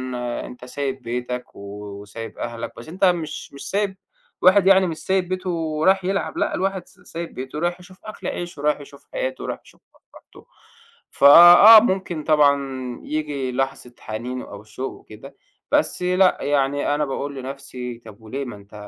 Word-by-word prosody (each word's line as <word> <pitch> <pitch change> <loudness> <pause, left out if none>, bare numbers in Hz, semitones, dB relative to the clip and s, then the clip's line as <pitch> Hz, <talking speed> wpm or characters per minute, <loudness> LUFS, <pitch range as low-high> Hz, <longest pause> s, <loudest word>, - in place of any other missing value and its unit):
أنت 125 0 -5
سايب 135 +1 -4
بيتَك 125 +1 -5
و - - -12 0.4
وسايب 110 +3 -9
أهلَك 115 -1 -5
بس 115 +7 -10
أنت 190 +4 +1
مش 165 -6 -1
مش 140 0 -8
سايب 200 0 -1 0.4
واحد 190 +1 +5
يعني 190 -1 +6
مش 160 - -4
سايب 190 0 -1
بيته 185 0 -3
ورياح 165 +3 +1
يلعب، 195 +2 -2
لأ، - - 0
الواحد 190 -1 -2
س - - -20
سايب 170 -1 -8
بيته 130 +3 -7
ورايح 175 +3 -1
يشوف 185 +1 -16
أكل 215 - -7
عيشه، 175 -4 -5
رايح 150 0 +1
يشوف 140 0 -14
حياته 130 0 -3
ورايح - - -4
يشوف - - -21
مصلحته. - - -19 0.7
فآه، 175 +9 +9
ممكن 185 -7 -2
طبعًا 145 -2 +4 0.5
ييجي 145 -4 -3
لحظة 135 -1 -3
حنين 120 +4 -5
أو 100 0 -10
شوق 115 +5 -6
وكده 135 +6 -14 0.4
بس - - +1
لأ، 180 +1 +3
يعني 145 0 0
أنا 150 0 0
باقول 140 +1 -4
لنَفْسي 130 -2 -7
طَب 105 -1 -13
وليه 130 +6 -5
ما 120 -4 -7
أنت 100 +1 -17
145 Hz, 165 wpm, -22 LUFS, 125-180 Hz, 0.7 s, فآه